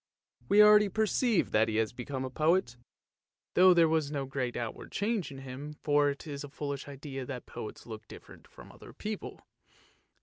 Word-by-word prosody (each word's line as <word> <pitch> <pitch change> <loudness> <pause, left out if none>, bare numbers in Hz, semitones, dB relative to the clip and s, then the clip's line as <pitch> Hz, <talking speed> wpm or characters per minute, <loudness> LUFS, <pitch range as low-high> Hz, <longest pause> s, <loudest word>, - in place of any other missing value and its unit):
" - - -32
We 210 +1 +7
already 210 -1 +7
perceive 220 +1 +1
that 110 +1 +3
he 110 - -2
has 110 +1 0
become 130 +2 -5
a 130 - -6
poet, 155 -3 +1 0.8
though 185 +1 +7
there 170 -2 +5
was 160 -2 +1
no 140 -2 -3
great 130 -2 -3
outward 115 -2 -6
change 210 -2 -1
in 135 - -9
him, 135 +3 -8
for 145 -1 +3
it 140 +3 -5
is 145 -2 -6
a 145 - -8
foolish 140 -1 -5
idea 135 -1 -7
that 125 -1 -7
poets 110 - -8
look 110 -2 -9
different - - -13
from - - -14
other - - -14
people. 215 0 -6
145 Hz, 190 wpm, -30 LUFS, 130-180 Hz, 0.8 s, We